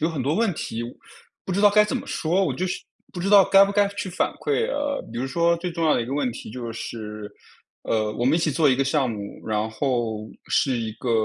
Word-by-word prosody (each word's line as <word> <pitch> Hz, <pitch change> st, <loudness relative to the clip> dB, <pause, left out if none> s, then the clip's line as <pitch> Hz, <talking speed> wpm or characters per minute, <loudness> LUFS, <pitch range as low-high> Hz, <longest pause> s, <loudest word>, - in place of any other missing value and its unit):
有 160 Hz, -, +2 dB
很 155 Hz, -5 st, -3 dB
多 140 Hz, +5 st, 0 dB
问 220 Hz, -1 st, +2 dB
题， 115 Hz, -5 st, -4 dB
我 120 Hz, -, -5 dB, 0.5 s
不 185 Hz, -, -3 dB
知 200 Hz, -, 0 dB
道 210 Hz, -, +7 dB
该 210 Hz, +1 st, +5 dB
怎 210 Hz, -, -2 dB
么 -, -, -6 dB
说， 180 Hz, +5 st, 0 dB
我 140 Hz, -8 st, -1 dB
就 185 Hz, -, -2 dB
是 180 Hz, -, -2 dB, 0.3 s
不 180 Hz, -, -6 dB
知 185 Hz, -, -1 dB
道 200 Hz, -1 st, +8 dB
该 195 Hz, +1 st, +7 dB
不 200 Hz, -, -3 dB
该 205 Hz, 0 st, +3 dB
去 200 Hz, -1 st, -5 dB
反 185 Hz, -, -1 dB
馈。 455 Hz, +2 st, 0 dB
呃， 290 Hz, -, -2 dB
比 115 Hz, -, -4 dB
如 130 Hz, -, -1 dB
说 170 Hz, +5 st, +2 dB
最 175 Hz, +1 st, -4 dB
重 165 Hz, -1 st, -2 dB
要 155 Hz, -, +4 dB
的 -, -, +1 dB
一 -, -, -6 dB
个 135 Hz, -, -3 dB
问 140 Hz, -4 st, 0 dB
题 -, -, -9 dB
就 120 Hz, -1 st, -6 dB
是， 105 Hz, -2 st, -7 dB, 0.5 s
呃， 110 Hz, -1 st, 0 dB
我 120 Hz, -, -2 dB
们 135 Hz, +4 st, +4 dB
一 -, -, +3 dB
起 160 Hz, -2 st, +1 dB
做 150 Hz, +2 st, +3 dB
一 130 Hz, -, +2 dB
个 135 Hz, -, +1 dB
项 135 Hz, -2 st, +1 dB
目， 100 Hz, -2 st, -7 dB
然 110 Hz, 0 st, 0 dB
后 110 Hz, -3 st, -2 dB, 0.2 s
是 130 Hz, -3 st, +2 dB
一 110 Hz, -2 st, -3 dB
个 120 Hz, +2 st, -4 dB
145 Hz, 290 characters per minute, -24 LUFS, 115-185 Hz, 0.5 s, 道